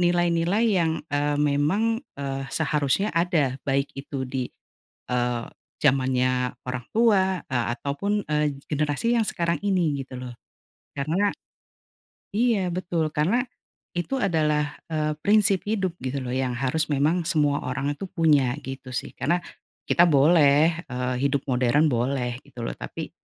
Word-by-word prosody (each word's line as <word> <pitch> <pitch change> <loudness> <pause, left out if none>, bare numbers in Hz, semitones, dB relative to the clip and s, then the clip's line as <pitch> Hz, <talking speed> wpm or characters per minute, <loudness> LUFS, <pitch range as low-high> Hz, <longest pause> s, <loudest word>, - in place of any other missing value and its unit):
nilai-nilai 175 +4 +2
yang, 165 -5 +1
eee, 145 0 +1
memang, 150 +11 +1 0.2
eee, 135 -1 -3
seharusnya 150 +6 0
ada 160 -6 +1
baik 140 +1 +1
itu 135 -1 -5
di, 130 -1 -3 0.6
eee, 120 -1 0 0.4
zamannya 130 -2 +2 0.2
orang 125 -1 -3
tua, 195 -5 +3
eee, 125 -3 0
ataupun, 200 +11 -2
eee, 150 -2 +1
generasi 150 +10 0
yang 225 - +2
sekarang 170 -3 0
ini 170 -8 +1
gitu 130 -1 -9
loh, 125 -1 -7 0.6
karena 170 +9 +1 1.0
iya 220 -5 +2
betul 175 -3 -1
karena 190 +12 +2 0.5
itu 175 +10 -1
adalah, 150 -5 +1 0.2
eee, 155 -1 0
prinsip 205 -2 +4
hidup 190 -5 0
gitu 130 +1 -2
loh 125 -1 -4
yang 130 -1 0
harus 135 +5 0
memang 150 +6 +2
semua 150 -4 +2
orang 135 +3 -1
itu 195 - -6
punya 150 -8 +3
gitu 135 -1 -8
sih - - -3
karena, 170 +5 +1 0.5
kita 175 - +5
boleh, 155 +2 +5
eee, 125 0 -2
hidup 140 -1 +1
modern 125 +4 +3
boleh 125 0 -1
gitu 125 -4 -9
loh - - -3
tapi, - - -6
150 Hz, 135 wpm, -25 LUFS, 135-175 Hz, 1.0 s, kita